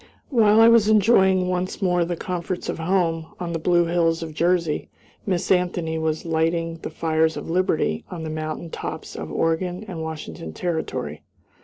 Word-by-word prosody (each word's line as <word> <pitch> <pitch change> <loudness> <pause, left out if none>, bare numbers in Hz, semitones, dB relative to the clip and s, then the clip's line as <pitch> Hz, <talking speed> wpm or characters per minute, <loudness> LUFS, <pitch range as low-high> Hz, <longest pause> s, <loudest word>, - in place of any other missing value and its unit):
While 220 -4 +5
I 225 - +8
was 230 -2 +6
enjoying 190 -4 +4
once 180 +1 -2
more 180 -3 +2
the 175 +1 -2
comforts 180 +1 -4
of - - -3
home, 165 -2 0
on 175 -1 -3
the 165 - -2
blue 175 +1 +3
hills 165 -1 +1
of 160 -1 -7
Jersey, 170 -1 0 0.4
Miss 180 -3 0
Anthony 175 -3 +1
was 160 0 -1
lighting 165 0 0
the - - -5
fires 160 0 +1
of - - -5
liberty 165 - +1
on 170 -3 -6
the 160 - -4
mountain 155 +1 -5
tops - - -6
of - - -6
Oregon 180 +4 -1
and 175 -5 -5
Washington 155 - -6
Territory. 170 - -3
170 Hz, 170 wpm, -23 LUFS, 160-185 Hz, 0.4 s, I